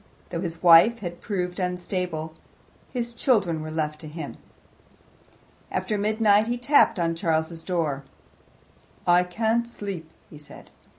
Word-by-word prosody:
Though 170 -1 -3
his 170 -2 -5
wife 175 +7 +7
had 175 -2 -6
proved 180 -3 -3
unstable 180 -3 -3 0.6
his 240 -2 -3
children 200 - +1
were 155 - -6
left 155 -1 -2
to 155 - -9
him. 150 -1 -7 1.3
After 215 - -2
midnight 210 0 +3
he 240 +1 -1
tapped 245 -3 +4
on 165 -1 0
Charles's 165 0 -1
door. 155 -7 -1 1.0
"I 175 0 +5
can't 225 +6 0
sleep," 195 -8 -6 0.2
he 150 - -13
said. 150 - -12
180 Hz, 130 wpm, -25 LUFS, 165-215 Hz, 1.3 s, wife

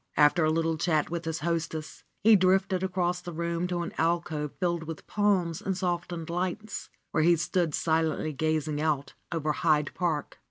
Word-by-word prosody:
After 150 +3 +5
a 155 - +3
little 165 0 +1
chat 155 -2 +1
with 170 0 -3
his 160 -1 -3
hostess, 165 -1 -3 0.2
he 220 +1 +8
drifted 190 -1 +3
across 180 -1 0
the 175 - -7
room 170 +1 -2
to 175 -1 -1
an 170 - -6
alcove 160 -3 0
filled 170 -3 0
with 160 -1 -7
palms 190 -6 +1
and 190 -2 -2
softened 175 -2 -2
lights, 185 +4 -3 0.2
where - - +2
he 170 +2 +5
stood 170 -1 0
silently 160 -1 0
gazing 155 0 0
out 145 -3 0 0.2
over 155 -3 0
Hyde 150 -2 +2
Park. 165 -5 -2
170 Hz, 170 wpm, -28 LUFS, 155-180 Hz, 0.2 s, he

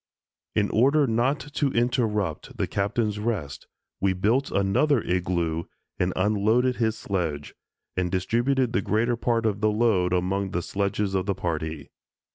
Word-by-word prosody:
In 105 -1 +1
order 140 +6 +4
not 125 +4 +1
to 145 -3 +1
interrupt 115 - -1
the - - +1
Captain's 105 +1 -1
rest, 105 -11 -3 0.3
we 95 -1 +2
built 110 +9 +1
another 120 +9 +2
igloo 85 -2 -1 0.3
and 90 +1 +1
unloaded 110 +6 +2
his 110 -1 0
sledge, 80 -9 -3 0.4
and 90 -1 -1
distributed 120 +7 +1
the 120 - +2
greater 115 +5 +1
part 115 -1 0
of 105 -2 0
the 110 - +3
load 105 -5 +2
among 95 +2 0
the 85 - -1
sledges 100 0 -1
of 95 0 0
the 100 - 0
party. 80 -5 -4
105 Hz, 145 wpm, -25 LUFS, 90-120 Hz, 0.4 s, order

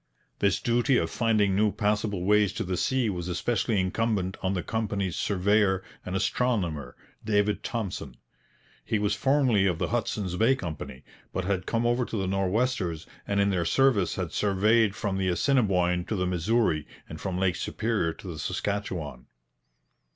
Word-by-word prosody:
This 100 -2 +2
duty 120 +2 +2
of - - 0
finding 105 -5 +2
new 105 +1 +3
passable 105 -2 -1
ways 105 -1 +3
to - - -3
the 90 0 -2
sea 130 +6 +1
was 90 -4 -3
especially 105 +3 0
incumbent 95 0 0
on 95 +1 0
the 90 - -2
company's 100 -5 -2
surveyor 100 0 +2 0.2
and 90 - -4
astronomer, 90 - -1 0.3
David 105 -1 +1
Thompson. 115 -7 -4 0.7
He 110 - 0
was 105 0 +1
formerly 125 -4 +3
of 90 -4 0
the - - -2
Hudson's 105 -6 -2
Bay 115 +6 +4
Company, 80 - -7 0.3
but 95 - -3
had 95 -2 -1
come 115 0 0
over 120 +1 +2
to 115 - -4
the 95 - -1
Nor'westers, 95 -2 0 0.2
and 100 0 0
in 100 0 +3
their 90 -3 +1
service 110 0 +2
had 90 -4 -3
surveyed 105 +1 +2
from 100 -4 -2
the 95 - 0
Assiniboine 90 -5 +2
to 110 - -2
the 90 -2 0
Missouri 90 -2 +1 0.2
and 80 - -9
from 95 -2 -3
Lake 90 -2 +1
Superior 110 -7 -1
to 95 - -11
the 80 -4 -6
Saskatchewan. 85 -7 -3
100 Hz, 165 wpm, -27 LUFS, 90-110 Hz, 0.7 s, Bay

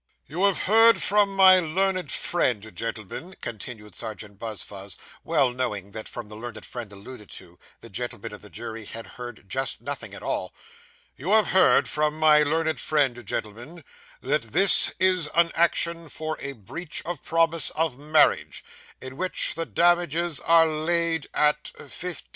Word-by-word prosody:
'You 175 +8 -1
have 200 -3 +1
heard 225 +3 +5
from 200 -1 +2
my 190 -1 +7
learned 185 +2 -1
friend, 110 - -1
gentlemen,' 115 - -6
continued 110 -3 -8
Serjeant 105 -3 -7
Buzfuz, 100 -3 -7 0.3
well 140 -6 +2
knowing 105 -6 -3
that, 110 +1 -7
from 120 -3 -7
the 105 - -10
learned 110 -1 -8
friend 120 -4 -7
alluded 105 +2 -12
to, 90 -1 -12 0.2
the - - -12
gentlemen - - -5
of - - -10
the - - -13
jury 110 -1 -7
had 115 +2 -8
heard 120 -5 -10
just 130 +5 -2
nothing - - -6
at - - -10
all - - -3 0.6
'you 175 +10 -1
have 215 -3 +4
heard 190 - +4
from 150 0 -1
my 155 -1 +5
learned 160 +2 0
friend, 135 -6 0
gentlemen, 120 - -5 0.4
that 145 +3 0
this 175 - +5
is 185 -4 +2
an 170 0 +4
action 170 -1 +1
for 155 +1 -4
a 140 0 -5
breach 135 - -5
of 175 +1 -5
promise 165 0 +2
of 155 -5 -1
marriage, 150 +1 +2 0.4
in 130 0 -8
which 185 +2 +3
the 165 0 -4
damages 170 -2 +2
are 165 0 +5
laid 165 0 0
at 150 0 +2
£1,500. 175 +5 -6
150 Hz, 160 wpm, -25 LUFS, 115-170 Hz, 0.6 s, my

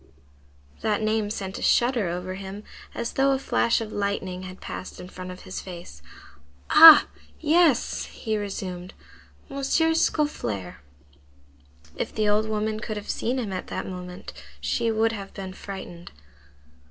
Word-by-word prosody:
That 215 0 0
name 215 -1 +1
sent 195 -2 -5
a - - -9
shudder 240 -5 +3
over 180 +2 -4
him, 195 +2 -7 0.3
as 235 - -3
though 275 0 +3
a - - +1
flash 235 -3 +1
of 215 -1 -5
lightning 200 -2 -2
had 185 0 -9
passed 185 - -7
in 180 - -9
front 185 -1 -8
of 180 0 -9
his 185 - -6
face. 170 - -10 0.7
"Ah! 325 -1 +11 0.3
yes," 315 -4 +3
he 220 -2 -4
resumed; 190 -3 -5 0.6
"M. 275 - -6
Scaufflaire!" 290 - 0 1.2
If - - -4
the 215 -1 +1
old 210 +1 +2
woman 215 0 -1
could 215 0 -4
have 210 - -4
seen 245 +3 -1
him 220 -6 -3
at 185 - -5
that - - -4
moment, 180 -1 -8 0.3
she 235 -1 0
would 225 0 +2
have 200 -3 -7
been 190 -2 -6
frightened. 190 -3 -9
205 Hz, 150 wpm, -25 LUFS, 185-230 Hz, 1.2 s, Ah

